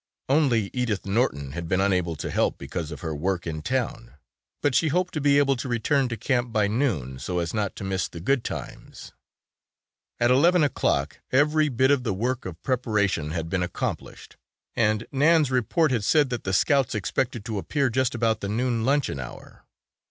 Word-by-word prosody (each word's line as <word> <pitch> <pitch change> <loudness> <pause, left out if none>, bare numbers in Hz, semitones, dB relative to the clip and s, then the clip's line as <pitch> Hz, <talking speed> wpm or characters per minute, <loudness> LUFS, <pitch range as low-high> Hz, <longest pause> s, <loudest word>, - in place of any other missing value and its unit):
Only 130 -8 +2
Edith 120 -6 -1
Norton 95 - 0
had 85 +2 -5
been 95 - +1
unable 90 -4 +1
to 75 - -5
help - - +1
because 85 -4 -5
of 75 - -8
her 80 -2 -3
work 90 +4 -2
in 80 -2 -4
town, 120 - -3 0.5
but 145 - +2
she 160 - +3
hoped 180 +4 0
to 155 - -2
be 140 0 +4
able 140 -1 +3
to 130 +1 -5
return 125 +3 +1
to 115 - -4
camp 120 +1 0
by 105 -2 +2
noon 100 - -1
so 90 +5 -3
as 85 -1 -2
not 105 -3 -2
to - - -7
miss 95 -1 -1
the 85 - -9
good 125 +8 +1
times. - - -8 1.1
At 120 +1 +3
eleven 170 +6 +5
o'clock 75 - 0
every 150 +3 +3
bit 130 +2 +2
of 140 -2 +3
the 110 -6 -2
work, 120 +5 -2
of 85 -2 -9
preparation 105 - 0
had 80 0 -3
been 90 +2 -1
accomplished 90 -1 -5 0.4
and 110 0 +1
Nan's 150 0 +3
report 130 - +2
had 115 -5 0
said 145 +3 +3
that 120 - -4
the 95 - -1
Scouts 135 +4 +2
expected 110 +4 -2
to 110 -4 -3
appear 140 +4 0
just 130 0 0
about 115 -2 +1
the 100 - -4
noon 115 +1 0
luncheon 135 - +1
hour. 65 - -10
115 Hz, 190 wpm, -25 LUFS, 95-135 Hz, 1.1 s, eleven